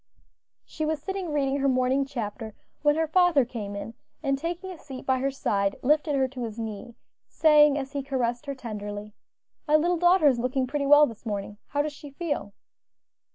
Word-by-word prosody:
She 310 - -5
was 310 0 0
sitting 380 +1 -4
reading 280 -2 +1
her 275 - +1
morning 260 +1 +1
chapter 225 -4 -5 0.3
when 295 0 +3
her 320 +1 +1
father 325 -4 +4
came 210 -4 -6
in, 210 +3 -6 0.3
and 275 -1 +1
taking 345 +6 -4
a 360 - -9
seat 265 -3 -9
by 260 -1 +2
her 270 +1 0
side, 200 -7 0
lifted 295 +2 +2
her 265 -1 +2
to 255 -1 -6
his 225 -1 -5
knee, 225 +1 -6 0.3
saying, 300 -2 +5
as 270 -1 -4
he 280 -1 -2
caressed 260 -1 -2
her 280 - -3
tenderly, 210 -3 -6 0.5
"My 300 - +4
little 345 +3 +3
daughter 350 -1 +4
is 255 -4 +3
looking 255 +2 0
pretty 280 +2 -2
well 295 +1 +8
this 230 -6 -9
morning; 205 -2 -4
how 290 +1 0
does 300 0 -4
she 290 0 -11
feel?" 290 -7 -4
275 Hz, 195 wpm, -26 LUFS, 235-300 Hz, 0.5 s, well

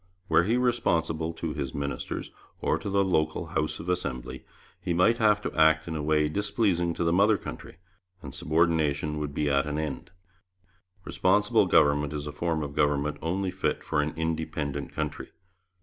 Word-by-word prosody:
Were 85 - +4
he 115 +5 +2
responsible 85 -10 0
to 80 - -4
his 65 -3 -4
ministers 70 0 -4 0.3
or - - 0
to - - -5
the 100 0 +2
local 80 -2 0
House 75 -2 -1
of 85 - -8
Assembly, 65 -8 -3 0.4
he 85 - -1
might 115 +7 +3
have 105 -2 +4
to - - -4
act 80 0 +4
in 80 - -4
a 75 - -2
way 75 0 +2
displeasing 95 -2 0
to - - -1
the 85 0 +2
mother 100 +3 +4
country, - - -9 0.5
and 70 -2 -8
subordination 75 -2 +1
would 75 -1 -4
be 75 - 0
at 70 0 +2
an 75 0 -2
end. 80 +2 -4 1.0
Responsible 105 +3 +2
Government 75 0 +3
is 75 -1 -4
a 75 - -5
form 80 -1 -1
of 70 -1 -6
government 75 0 +1
only 95 +3 -1
fit - - -2
for 75 - 0
an 75 +1 -3
independent 80 -3 -3
country. - - -4
80 Hz, 175 wpm, -27 LUFS, 75-90 Hz, 1.0 s, Were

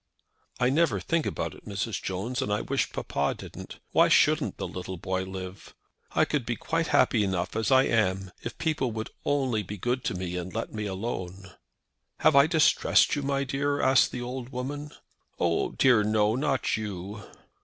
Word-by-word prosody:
"I 125 +1 +3
never 165 +4 +2
think 165 -2 0
about - - -3
it, - - -15
Mrs. 100 +1 -3
Jones; 100 +7 -3
and 105 - -2
I 105 - +1
wish - - -1
papa 70 +1 -1
didn't. - - -9
Why - - +5
shouldn't - - +3
the - - -3
little 90 0 -6
boy 95 +2 -2
live? 95 0 -8 0.4
I - - +4
could 150 -4 -1
be 120 0 -2
quite 165 +7 -1
happy 120 -4 +3
enough 95 -1 -2
as 110 +3 0
I 130 -1 +6
am 95 -6 +1
if - - -6
people 150 -6 0
would 110 0 -5
only 130 -6 +1
be 105 +2 -7
good 125 +6 -1
to - - -1
me 90 -1 -4
and 90 +2 -6
let 115 - -3
me 105 -1 -3
alone." 95 -2 -5 0.7
"Have 155 - +5
I 140 +1 +7
distressed 160 -1 +4
you?" 140 0 -1
asked 130 -1 +5
the 125 - -4
old 125 0 -5
woman. 140 +3 -5 0.5
"Oh, 85 -1 +1
dear 125 -5 +4
no; 105 0 +2
not 135 -3 0
you." 105 -1 -6
115 Hz, 175 wpm, -27 LUFS, 95-135 Hz, 0.7 s, I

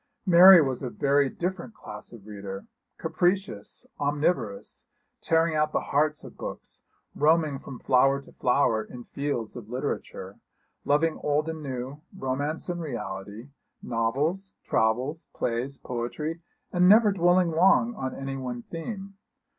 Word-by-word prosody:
Mary 180 -1 +9
was 130 -3 -2
a 130 - -3
very 140 +2 +2
different 185 - -4
class - - -10
of 110 -4 -13
reader; 100 -2 -7 0.3
capricious, 180 - -1
omniverous, 145 - -1 0.3
tearing 165 0 +2
out 155 0 +1
the - - +2
hearts 150 +1 +2
of - - -11
books, - - -7 0.3
roaming 155 -2 +2
from 135 - -9
flower 135 +3 +3
to 140 - -15
flower 125 -4 +2
in 120 +3 -10
the - - -15
fields 140 -6 -3
of 115 -3 -9
literature, 130 +4 -5 0.5
loving 155 +2 +2
old 150 +1 +1
and 160 -1 -4
new, 135 +1 -5 0.2
romance 145 +2 -2
and 175 -1 -3
reality, 110 -4 -6 0.3
novels, 140 +12 -1
travels, 125 +8 0
plays, 125 +4 -2
poetry, 150 +7 -4 0.3
and 180 0 +5
never 215 0 +7
dwelling 175 -1 +3
long 190 +8 +4
on 130 - -4
any 135 0 -5
one 125 -2 -5
theme. 195 +3 -7
145 Hz, 140 wpm, -27 LUFS, 125-170 Hz, 0.5 s, Mary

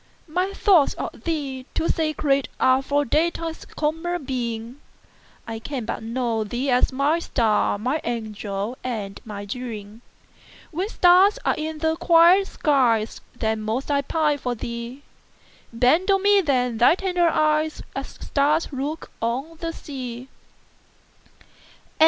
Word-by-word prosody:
My 360 +5 -1
thoughts 385 -7 +4
of - - -7
thee 280 -5 -3
too 330 - 0
sacred 300 -4 +1
areFor 270 +2 +2
daylight's 330 +2 -1
common 325 +2 -2
beam:I 235 -2 -7
can 255 0 -5
but - - -4
know 230 -1 -1
thee 245 +6 -2
as 250 - +3
my 280 +5 +1
star, 225 -10 +1
My 255 +9 -1
angel 215 -1 -4
and 210 -6 -4
my 205 -2 -6
dream; 215 -1 -7 0.7
When 365 +6 -2
stars 370 +1 +5
are - - +3
in 315 0 -4
the 320 +1 0
quiet 345 +3 +5
skies, 240 -7 +1
Then 220 -2 -1
most 225 +7 -2
I 280 -1 +2
pine 300 0 0
for 245 -1 -2
thee; 235 +4 -6 0.7
Bend 260 - +3
on 390 0 +3
me 405 0 +5
then 250 -7 0
thy 245 +7 +6
tender 360 -2 +1
eyes, 310 0 +1
As 275 0 -4
stars 300 +3 0
look 285 +4 -4
on 265 +8 -2
the 330 -1 -3
sea! 255 -5 -7
275 Hz, 130 wpm, -23 LUFS, 235-320 Hz, 0.7 s, thy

